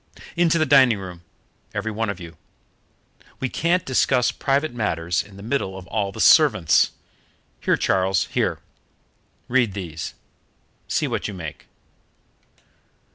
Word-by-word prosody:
"Into 170 -1 +3
the 155 - +2
dining 130 -7 +5
room, 90 -3 -9 0.5
every 110 +2 -2
one 110 0 -2
of 100 - -4
you. 85 -1 -10 1.0
We 130 - -2
can't 170 +6 0
discuss 130 -1 +2
private 140 +1 0
matters 85 -7 -1
in 100 -1 -14
the 100 - -10
middle 110 -6 -2
of 95 - -10
all 100 0 -2
the - - -10
servants. 80 - +5 0.7
Here, - - +1
Charles, 95 -1 +1
here; - - -1 0.9
read 120 -5 +2
these. 80 -5 -6 0.7
See - - 0
what - - -2
you 105 - -6
make." 80 -5 -8
105 Hz, 130 wpm, -23 LUFS, 95-130 Hz, 1.0 s, dining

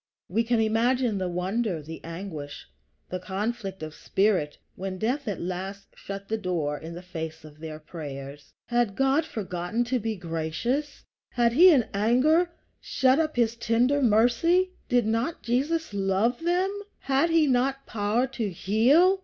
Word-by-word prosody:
We 220 +6 +1
can 235 0 +1
imagine 225 0 +2
the 185 -1 -1
wonder, 185 +2 -1
the 160 +2 -9
anguish, 165 -4 -7 0.5
the 185 - -2
conflict 195 0 -4
of 155 -1 -6
spirit, 190 -7 0 0.2
when 190 0 -5
death 250 +7 -1
at 200 -4 -2
last 190 +3 -5
shut 195 0 -7
the 220 0 -2
door 165 -7 -1
in 165 +1 -8
the 175 - -8
face 160 -3 -6
of 150 0 -14
their 155 -1 -6
prayers. 145 -3 -8
Had 240 -4 0
God 270 +4 +2
forgotten 190 - -2
to 245 +1 0
be 220 0 -2
gracious? 175 - -3 0.3
Had 235 -1 +2
he 350 +8 +8
in 270 -9 +4
anger 255 - +3 0.3
shut 265 +2 +2
up 310 -1 0
his 235 -2 +2
tender 240 +5 +2
mercy? 250 - +3 0.2
Did 245 -3 +3
not 230 +10 -1
Jesus 285 +4 0
love 200 +5 +1
them? 360 +3 +1 0.3
Had 275 +4 +2
he 325 -1 +4
not 270 +1 +1
power 220 +3 0
to 240 -5 -3
heal? 260 - +4
220 Hz, 155 wpm, -26 LUFS, 180-260 Hz, 0.5 s, he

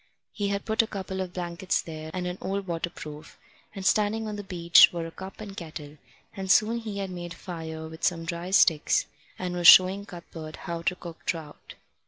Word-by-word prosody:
He 205 - -2
had 200 0 -2
put 220 0 +3
a 225 - -3
couple 190 -2 -4
of 185 -1 -4
blankets 175 0 -1
there 155 -1 -7
and 180 +1 -3
an 180 +1 -4
old 195 +1 -2
waterproof, 165 -3 -6 0.4
and 195 -1 -6
standing 215 +2 +2
on 210 - -4
the 205 - -6
beach 170 -3 +6
were 170 -1 -4
a 165 - -7
cup 190 +3 -10
and 205 -2 -8
kettle; 155 -4 -8 0.4
and 190 -1 -5
soon 215 +5 +4
he 215 -3 -6
had 195 -1 -3
made 175 -1 -6
a - - -15
fire 160 -3 -6
with 160 0 -11
some 165 -2 +1
dry 170 +1 -4
sticks, 165 -5 +4 0.3
and 180 -1 -3
was 175 -1 +3
showing 190 +3 +8
Cuthbert 165 -3 -9
how 170 -2 -3
to 180 +2 0
cook 170 -2 -10
trout. 160 -3 -5
180 Hz, 205 wpm, -27 LUFS, 165-195 Hz, 0.4 s, showing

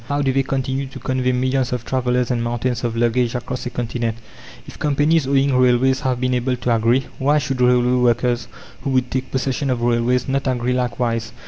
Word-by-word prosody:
How 145 0 0
do 135 -1 +1
they 135 - +3
continue 135 0 -2
to 130 - -10
convey 130 -1 -1
millions 130 0 0
of 125 -2 -3
travellers 125 -1 0
and 120 -1 0
mountains 120 +1 -2
of 115 -1 -2
luggage 120 +1 +1
across 125 +1 -4
a - - -2
continent? 115 -2 -3 0.5
If - - -12
companies 150 0 +2
owning 140 0 +2
railways 130 +1 +3
have 130 -2 -1
been 125 0 0
able 125 +1 0
to 120 -1 0
agree, 115 +4 +2
why 145 +3 +3
should 135 -3 -2
railway 125 0 +3
workers, 120 0 +1 0.3
who - - -3
would 130 -1 0
take 130 0 -2
possession 135 +2 -1
of 120 -2 -1
railways, 120 +2 +1
not 135 0 -1
agree 125 -1 0
likewise? 120 -2 -1
125 Hz, 200 wpm, -20 LUFS, 120-130 Hz, 0.5 s, they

